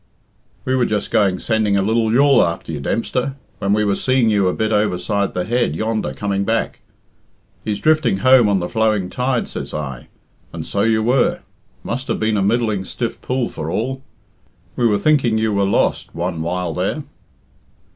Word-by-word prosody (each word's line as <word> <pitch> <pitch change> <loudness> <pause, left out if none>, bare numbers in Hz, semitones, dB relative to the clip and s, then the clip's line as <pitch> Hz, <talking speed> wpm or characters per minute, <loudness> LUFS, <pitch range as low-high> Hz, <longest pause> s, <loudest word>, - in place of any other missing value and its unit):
"We 130 - 0
were 125 -2 +2
just 105 -1 -2
going 100 -5 +2
sending 110 -1 +1
a 95 - +2
lil 110 +1 +1
yawl 140 +3 +5
after 85 -1 -3
you, 75 - -4
Dempster, 125 - -2 0.2
when 100 - -1
we 105 +1 +2
were 100 - +2
seeing 130 -2 +2
you 100 -3 +2
a - - +2
bit 110 0 -1
overside 100 -1 0
the 90 - 0
head 120 -9 0
yonder 110 +4 -1
coming 100 -1 -2
back. 115 +3 -1 0.8
'He's 105 -2 -2
drifting 155 -10 +2
home 125 +1 +5
on 100 - +3
the 90 - -3
flowing 110 -4 0
tide,' 125 +3 -1
says - - -5
I, 65 -5 -5 0.4
and - - -6
so 100 - -1
you 110 0 +2
were. 125 +2 +2 0.4
Must 130 +3 -4
have 115 - -1
been 110 0 +1
a - - +1
middling 110 -1 +1
stiff 115 +4 -4
pull 125 -2 -1
for 75 - -6
all. 130 +9 -2 0.7
We 120 - +2
were 105 -2 +2
thinking 135 -7 +2
you 110 -1 0
were 100 0 +2
lost 100 - 0
one 85 -1 -3
while 85 0 -2
there." - - -2
110 Hz, 185 wpm, -19 LUFS, 95-120 Hz, 0.8 s, yawl